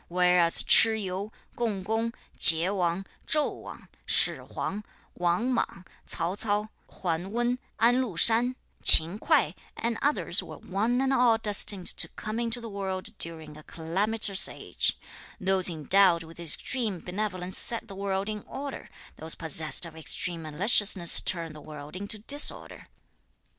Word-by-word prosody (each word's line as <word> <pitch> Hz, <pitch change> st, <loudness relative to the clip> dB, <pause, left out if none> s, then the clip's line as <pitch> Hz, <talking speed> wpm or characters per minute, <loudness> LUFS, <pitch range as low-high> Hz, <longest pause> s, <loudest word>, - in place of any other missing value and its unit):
Whereas 180 Hz, -1 st, +3 dB
Ch'i 220 Hz, -1 st, +5 dB
Yu, 190 Hz, +3 st, -5 dB, 0.2 s
Kung 210 Hz, -6 st, -3 dB
Kung, 225 Hz, +2 st, -2 dB, 0.2 s
Chieh 170 Hz, +5 st, +7 dB
Wang, 180 Hz, 0 st, -2 dB, 0.2 s
Chou 300 Hz, -1 st, +2 dB
Wang, -, -, -12 dB, 0.2 s
Shih -, -, +1 dB
Huang, 210 Hz, +2 st, -6 dB, 0.3 s
Wang 180 Hz, +9 st, -1 dB
Mang, 195 Hz, -5 st, -4 dB, 0.2 s
Tsao 165 Hz, +2 st, -4 dB
Ts'ao, 210 Hz, 0 st, -3 dB, 0.3 s
Wen 175 Hz, +2 st, -3 dB
Wen, 240 Hz, +2 st, -1 dB, 0.2 s
An 235 Hz, +2 st, +3 dB
Hu 215 Hz, -10 st, -6 dB
shan, 235 Hz, +6 st, +3 dB, 0.3 s
Ch'in 170 Hz, +6 st, +8 dB
Kuei -, -, +1 dB, 0.2 s
and 230 Hz, -1 st, -3 dB
others 290 Hz, +1 st, 0 dB
were -, -, -11 dB
one 225 Hz, +7 st, -2 dB
and 270 Hz, 0 st, 0 dB
all 245 Hz, -3 st, +3 dB
destined 205 Hz, -3 st, 0 dB
to -, -, +2 dB
come 215 Hz, +1 st, -7 dB
into 235 Hz, 0 st, -3 dB
the 230 Hz, -, -9 dB
world 190 Hz, -3 st, -5 dB
during 160 Hz, -2 st, -3 dB
a 155 Hz, -, -13 dB
calamitous 195 Hz, +6 st, -1 dB
age. -, -, -1 dB, 0.4 s
Those 190 Hz, -1 st, +2 dB
endowed 170 Hz, +2 st, +2 dB
with 165 Hz, +1 st, -15 dB
extreme 205 Hz, -, 0 dB
benevolence 185 Hz, 0 st, -1 dB
set 230 Hz, -1 st, +3 dB
the 200 Hz, -, -10 dB
world 195 Hz, 0 st, -4 dB
in 215 Hz, -1 st, -5 dB
order; 275 Hz, 0 st, -8 dB, 0.3 s
those 160 Hz, +1 st, -1 dB
possessed 160 Hz, +1 st, 0 dB
of 165 Hz, -1 st, -12 dB
extreme 165 Hz, +2 st, -2 dB
maliciousness 180 Hz, +3 st, +3 dB
turn 165 Hz, -3 st, -3 dB
the 155 Hz, -, -13 dB
world 150 Hz, +1 st, -11 dB
into 200 Hz, +3 st, -3 dB
disorder. 280 Hz, +8 st, -3 dB
195 Hz, 150 wpm, -26 LUFS, 170-225 Hz, 0.4 s, Ch'in